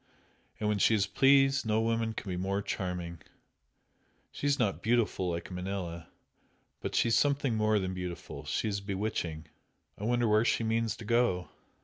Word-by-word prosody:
And 105 - -1
when 105 -1 +1
she 110 - +4
is 100 -2 +2
pleased 135 +6 +4
no 110 -1 +1
woman 115 0 0
can 110 - -7
be 90 - -2
more 95 +2 -1
charming! 90 -4 -4 1.1
She 145 - -3
is 140 0 +3
not 110 -8 0
beautiful, 110 -5 +1
like 85 +2 -4
Manella 90 -2 -4 0.7
but - - -4
she 115 - +3
is 115 - +3
something 140 -3 +2
more 110 -1 +2
than 95 -2 -1
beautiful 90 -5 -6
she 75 +8 -1
is 100 -1 -2
bewitching! 95 -5 -3 0.5
I 105 - -4
wonder 120 0 +2
where 110 +1 +4
she 115 - +1
means 115 -1 0
to 115 - -9
go!" 115 -6 +1
105 Hz, 170 wpm, -30 LUFS, 90-115 Hz, 1.1 s, she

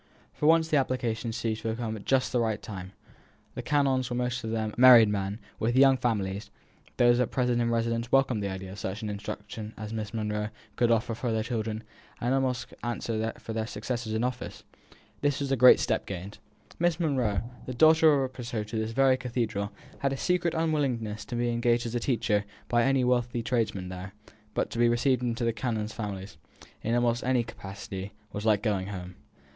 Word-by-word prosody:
For 150 - 0
once 160 0 +5
the 155 - +2
application 120 -4 -1
seemed 115 -1 -2
to 115 +1 -6
have 110 0 -1
come 115 -2 -3
just 135 -1 +2
at - - -13
the 125 - +1
right 110 -2 -1
time. 95 -2 -8 0.6
The - - -5
canons 135 -3 +1
were 120 - -2
most 125 +1 -1
of 110 - -3
them 110 -1 -2
married 120 -3 +8
men, 100 0 -2 0.2
with 120 +2 0
young 135 0 +7
families; 105 -5 -2 0.5
those 120 0 +5
at 125 - +1
present 125 -2 +1
in 115 - +1
residence 115 0 -1
welcomed 135 -5 +3
the 100 - -2
idea 95 0 -6
of 100 - -8
such 95 +4 -4
instruction 105 +1 -6
as 105 0 -6
Miss 110 -2 -4
Monro 105 -1 -2 0.3
could 120 -1 +2
offer 115 +1 +2
for 115 +1 -2
their 110 -1 0
children, 110 -2 -3 0.4
and 120 - 0
could - - +3
almost 130 -2 -1
answer 115 -2 -2
for 110 - -7
their 110 0 -2
successors 115 +1 -4
in 110 +2 0
office. 125 0 -4 0.6
This 145 -1 +1
was 140 -1 -2
a - - +4
great 125 0 +8
step 110 -2 0
gained. 95 +2 -6 0.4
Miss 175 0 +2
Monro, 125 - +1 0.2
the 130 - -3
daughter 160 +2 +6
of 140 -2 +3
a 130 0 -4
precentor 115 -4 -4
to 115 - -3
this 110 +1 -2
very 135 +1 +4
cathedral, 115 -5 -2 0.3
had 140 - 0
a - - -3
secret 175 +1 +1
unwillingness 135 -10 -1
to - - -5
being 120 0 0
engaged 120 0 +2
as 115 - -4
a 120 - 0
teacher 115 -4 +1 0.3
by 120 0 +3
any 135 -1 +3
wealthy 120 -1 +1
tradesman 110 -7 -1
there; 95 +2 -8 0.4
but - - 0
to 115 - -4
be 120 0 +5
received 125 +1 +2
into 120 -1 -1
the 115 - +1
canons' 110 -2 -2
families, 100 -5 -6 0.4
in 115 +2 0
almost 120 0 +1
any 125 -1 +2
capacity, 100 -3 -7 0.2
was 105 +2 -3
like 105 -2 +3
going 100 -4 0
home. 90 -2 -6
115 Hz, 205 wpm, -28 LUFS, 105-125 Hz, 0.6 s, married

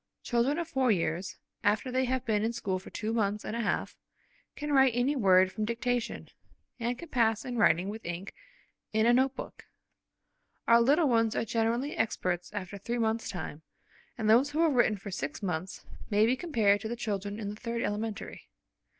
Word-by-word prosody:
Children 245 +5 +1
of 340 -1 -2
four 265 -5 +1
years, 175 -1 0 0.3
after 215 +5 +1
they 260 +1 +1
have 260 0 -1
been 215 -2 +1
in 230 +1 0
school 195 -5 -2
for 185 - -12
two 220 +1 -3
months 210 -2 0
and 215 - -4
a - - -2
half, 210 - -1 0.6
can 295 0 -3
write 265 -3 +5
any 255 +4 +1
word 190 -6 +5
from 215 - -3
dictation, 235 +2 -2 0.5
and 240 +1 -1
can 340 - -10
pass 225 -4 +2
to 250 - -6
writing 185 -6 +3
with 220 +2 -6
ink 175 +3 -5 0.6
in 220 +1 +3
a 240 - +5
note 260 +2 +3
book. - - -9 1.0
Our 235 0 +6
little 290 +6 +4
ones 230 -3 +2
are - - 0
generally 230 +5 0
experts 180 -5 -1
after 200 -1 -6
three 235 +5 -3
months' 225 0 0
time, 160 -4 -6 0.6
and 220 -3 -1
those 240 +6 +5
who 310 +3 +1
have 320 -3 +3
written 235 -4 +3
for 200 +1 -8
six 145 +1 -4
months 180 0 -4 0.2
may 210 +1 +4
be 245 +3 +2
compared 220 - +2
to 220 - -4
the 235 - -3
children 205 -3 -3
in 205 -2 -4
the 205 - -5
third 230 +1 -3
elementary. 210 +1 -4
225 Hz, 195 wpm, -30 LUFS, 205-245 Hz, 1.0 s, Our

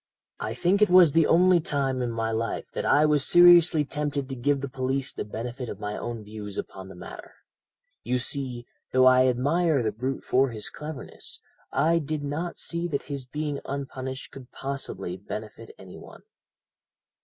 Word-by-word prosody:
"I - - -4
think 190 +4 +2
it 210 - +5
was 180 -3 +7
the 165 +1 +4
only 180 +1 +5
time 135 -4 -1
in 120 - -1
my 115 -1 -2
life 115 +1 -2
that - - -3
I 150 +1 +5
was 150 -2 +3
seriously 175 -3 +6
tempted 145 -1 -2
to 135 - -4
give 140 +2 0
the 140 - -3
police 130 0 -2
the - - -4
benefit 120 +3 -6
of - - -7
my 105 0 -4
own 120 -2 -5
views 105 -1 -8
upon 95 -1 -6
the 95 - -11
matter. 90 - -11 0.7
You 125 - 0
see, 125 -2 -2 0.3
though 130 0 +5
I 130 0 +6
admire 145 +3 +2
the 110 - 0
brute 130 +4 -4
for 135 +1 +2
his 110 -3 -6
cleverness, 150 -2 -8 0.3
I 165 +2 +2
did 150 -1 -4
not 155 +5 -4
see 170 0 -1
that 145 -5 -2
his 135 -3 -5
being 145 +1 -3
unpunished 135 -1 -6
could 130 -2 -12
possibly 115 -10 -5
benefit 110 +3 -8
any 95 -1 -12
one. - - -14
135 Hz, 180 wpm, -26 LUFS, 120-150 Hz, 0.7 s, was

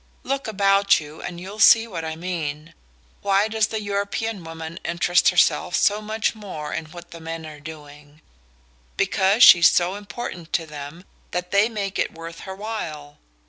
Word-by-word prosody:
Look 275 -1 -2
about 200 -1 +3
you 150 0 -11
and 175 -1 -6
you'll 195 +4 -9
see 225 +1 +7
what 180 -8 -6
I 160 0 -4
mean. 160 -3 -5 0.5
Why 200 +1 +2
does 220 -1 +1
the 220 - -3
European 200 0 -3
woman 165 0 -8
interest 175 +1 +3
herself 180 0 +2
so 210 +1 +2
much 215 +1 -1
more 190 -9 -7
in - - -3
what 170 +2 -12
the 170 - -10
men 165 0 -6
are 155 -1 -10
doing? 150 -1 -12 0.8
Because 195 +3 +3
she's 170 -2 +9
so 180 +1 +1
important 200 -4 -7
to 165 - +1
them 150 +3 -9 0.2
that 180 0 -4
they 200 +3 +4
make 200 -4 -4
it - - -1
worth 165 0 -9
her 190 -1 -8
while! 160 -9 -6
180 Hz, 170 wpm, -23 LUFS, 160-205 Hz, 0.8 s, she's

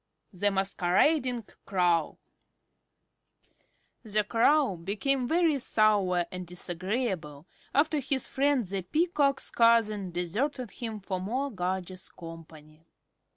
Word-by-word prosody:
THE 205 +3 +2
MASQUERADING 200 - +1 0.2
CROW 175 -4 +1 1.8
The 215 -2 0
Crow 235 - +3
became 230 +9 -1
very 325 -1 +2
sour 205 -7 +2
and 180 -1 -6
disagreeable 180 - -3 0.3
after 295 +2 +2
his 270 -1 0
friend 275 -3 +1
the 195 +1 -3
Peacock's 295 - +1
cousin 225 -4 +3
deserted 215 - -2
him 225 -4 -6
for 190 -1 -3
more 260 +8 -2
gorgeous 185 -1 -4
company. 160 -2 -13
205 Hz, 100 wpm, -28 LUFS, 180-260 Hz, 1.8 s, Crow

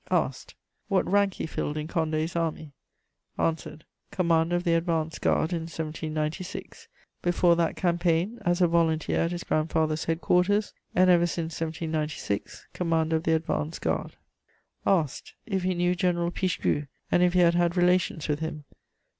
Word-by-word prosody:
Asked: - - -1 0.3
What 195 -1 +1
rank 200 -1 +2
he - - -3
filled 155 -1 -3
in 150 0 -3
Condé's 160 0 -1
Army? 160 -2 -2 0.7
Answered: 160 -1 -2 0.2
Commander 170 -2 +2
of 175 - 0
the 170 -2 +2
Advance 165 -1 0
Guard 160 +3 +1
in 165 -1 -3
1796; 155 +1 -5 0.3
before 175 0 +3
that 170 -1 0
campaign, 175 +4 +1
as 175 +1 +1
a 175 - +6
volunteer 165 -2 +1
at 165 - +1
his 175 0 -4
grandfather's 155 0 0
headquarters; 180 +5 +1 0.2
and, 185 0 +5
ever 175 -1 +4
since 165 -1 -4
1796, 155 -9 -3
Commander 165 -2 +1
of 160 - -5
the 160 - +3
Advance 160 -1 -2
Guard. - - -2 0.7
Asked: 165 -8 0
If 195 -4 -1
he 185 0 0
knew 175 +1 +2
General 175 -1 0
Pichegru, 175 -5 -1 0.2
and 175 - +4
if 180 0 +4
he 180 - +3
had 170 -1 +5
had 175 0 +1
relations 180 -3 +2
with 150 -1 0
him? 155 -2 -5
165 Hz, 155 wpm, -27 LUFS, 160-175 Hz, 0.7 s, a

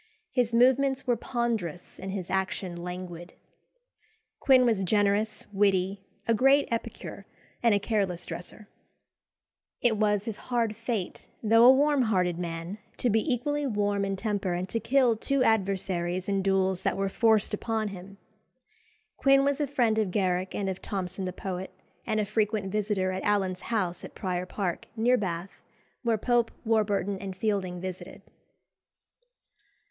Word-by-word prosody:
His 245 -3 +1
movements 260 +3 +3
were 245 -2 +2
ponderous 225 - -3
and 190 +1 -5
his 185 -2 -5
action 190 -1 -1
languid. 175 0 -7 1.1
Quin 260 -2 +5
was 220 -5 +2
generous, 205 +2 +1
witty, 195 -1 +2 0.3
a 230 - +4
great 270 +5 +4
epicure, 230 - -5 0.3
and 230 -3 +4
a - - +2
careless 195 -4 -1
dresser. 205 +4 -7 1.1
It 225 -3 +2
was 210 -1 +1
his 225 -3 -4
hard 230 -3 +1
fate, 230 -4 -4 0.2
though 225 +2 +6
a 255 - +10
warm 285 +1 +3
hearted 180 -7 +1
man, 170 +3 -5 0.2
to 245 - +1
be 225 +7 +1
equally 290 +4 0
warm 205 -3 0
in 195 0 -1
temper, 200 -2 -1
and 180 +1 -3
to 230 - -1
kill 250 -2 +3
two 275 +3 +1
adversaries 185 -4 0
in 195 -1 +1
duels 190 -1 +1
that - - 0
were 195 0 0
forced 220 +1 +2
upon 220 0 -1
him. 195 +1 -10 1.0
Quin 275 0 +5
was 280 +1 +1
a 290 - +1
friend 235 -5 +2
of 210 -3 +1
Garrick 185 -1 0
and 200 - -2
of 190 -1 -3
Thomson 190 -1 -4
the 185 - -2
poet, 185 0 -5 0.4
and 215 - +1
a 210 - +1
frequent 210 -1 -1
visitor 205 -2 0
at 185 0 -3
Allen's 195 -3 0
house 185 -7 -1
at - - -10
Prior 180 -2 -3
Park, 185 -3 -3
near 240 +3 +3
Bath, 185 -4 -4 0.4
where 230 -3 +1
Pope, 240 +1 +2 0.2
Warburton, 205 -3 +1
and 190 -1 -6
Fielding 190 -4 -1
visited. 185 0 -7
205 Hz, 150 wpm, -28 LUFS, 185-230 Hz, 1.1 s, a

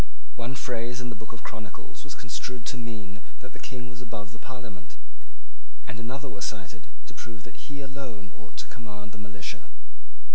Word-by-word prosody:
One 120 +3 +3
phrase 120 -1 +5
in 125 -1 +3
the 115 - +1
Book 110 - -2
of 115 -2 -4
Chronicles 110 -2 -2
was 145 -1 -1
construed 125 -1 +2
to - - +5
mean 110 -4 +1 0.2
that 130 - -4
the - - -5
King 125 -2 +1
was 125 0 -3
above 110 -4 0
the 115 - -5
Parliament; 115 -9 -3 0.9
and 110 - 0
another 135 +5 +2
was 100 -5 +3
cited 95 -3 -3 0.2
to - - -6
prove 110 -2 -3
that 120 - -6
he 145 -1 +1
alone 125 -9 -1
ought - - -9
to - - +2
command 105 -3 -3
the 105 - -4
militia. 100 -2 0
115 Hz, 185 wpm, -36 LUFS, 105-125 Hz, 0.9 s, phrase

